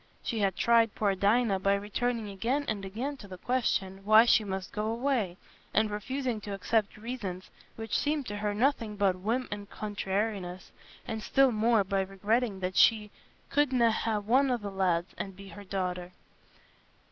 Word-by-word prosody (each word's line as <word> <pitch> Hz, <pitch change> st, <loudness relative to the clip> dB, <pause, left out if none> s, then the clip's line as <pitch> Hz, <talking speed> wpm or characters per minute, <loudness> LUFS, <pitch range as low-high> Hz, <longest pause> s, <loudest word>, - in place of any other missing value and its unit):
She 230 Hz, -, -2 dB
had 195 Hz, -3 st, +1 dB
tried 230 Hz, -2 st, +3 dB
poor 205 Hz, -2 st, +1 dB
Dinah 200 Hz, +1 st, +2 dB
by 200 Hz, +1 st, +2 dB
returning 220 Hz, +3 st, -2 dB
again 235 Hz, +9 st, -1 dB
and 205 Hz, -2 st, -2 dB
again 240 Hz, +9 st, -4 dB
to 205 Hz, -, -11 dB
the 185 Hz, -1 st, -9 dB
question, 195 Hz, -5 st, -1 dB
why 215 Hz, +3 st, +7 dB
she 235 Hz, -, +5 dB
must 190 Hz, -2 st, -5 dB
go 210 Hz, +1 st, -2 dB
away; 230 Hz, -6 st, -1 dB, 0.4 s
and 220 Hz, -1 st, +3 dB
refusing 245 Hz, +2 st, -3 dB
to 200 Hz, -1 st, -5 dB
accept 210 Hz, +2 st, 0 dB
reasons, 210 Hz, -5 st, -6 dB, 0.2 s
which 225 Hz, -1 st, -4 dB
seemed 295 Hz, -1 st, 0 dB
to 205 Hz, -2 st, -5 dB
her 205 Hz, 0 st, -2 dB
nothing 230 Hz, -3 st, +1 dB
but 200 Hz, -2 st, +2 dB
whim 230 Hz, +7 st, -1 dB
and 205 Hz, 0 st, -6 dB
"contrairiness"; 200 Hz, -3 st, -3 dB, 0.4 s
and 220 Hz, -, -3 dB
still 270 Hz, +3 st, +3 dB
more, 220 Hz, -1 st, +3 dB
by 195 Hz, 0 st, 0 dB
regretting 200 Hz, +2 st, -1 dB
that 185 Hz, 0 st, -2 dB
she 210 Hz, -2 st, +4 dB, 0.4 s
"couldna' 255 Hz, -5 st, +3 dB
ha' 220 Hz, -1 st, 0 dB
one 265 Hz, +5 st, +4 dB
o' 250 Hz, -, +2 dB
the 205 Hz, -3 st, -6 dB
lads" 180 Hz, -2 st, 0 dB
and 195 Hz, -1 st, -5 dB
be 195 Hz, +1 st, -11 dB
her 200 Hz, +4 st, -10 dB
daughter. 180 Hz, -2 st, -3 dB
210 Hz, 170 wpm, -29 LUFS, 195-235 Hz, 0.4 s, why